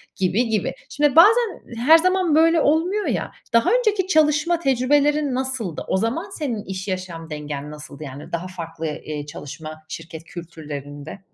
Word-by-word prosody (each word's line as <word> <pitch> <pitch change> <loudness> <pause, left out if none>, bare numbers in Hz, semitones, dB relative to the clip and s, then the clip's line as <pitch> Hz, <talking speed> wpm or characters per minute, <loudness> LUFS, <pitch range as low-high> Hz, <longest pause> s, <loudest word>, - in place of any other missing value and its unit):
gibi, 195 +6 +1
gibi. 215 -4 0 0.2
Şimdi, 295 -1 +1
bazen 435 +5 +6
her 270 +8 +7
zaman 365 -2 +2
böyle 330 0 +5
olmuyor, 355 +8 +2
ya, - - -1 0.2
daha 230 0 +4
önceki 430 -6 +2
çalışma 310 0 +3
tecrübelerin 285 +1 +2
nasıldı? 255 - -3
O - - +1
zaman 250 - -1
senin 270 - -3
iş, 190 +1 -6
yaşam 180 -3 -5
dengen 150 -1 -5
nasıldı, 150 0 -9
yani? 140 0 -9
Daha 170 +2 -3
farklı, 165 -3 -7
eee, 150 -1 -5
çalışma 155 +2 -8
şirket 165 -1 -8
kültürlerinde. 155 -2 -8
225 Hz, 150 wpm, -22 LUFS, -, 0.2 s, her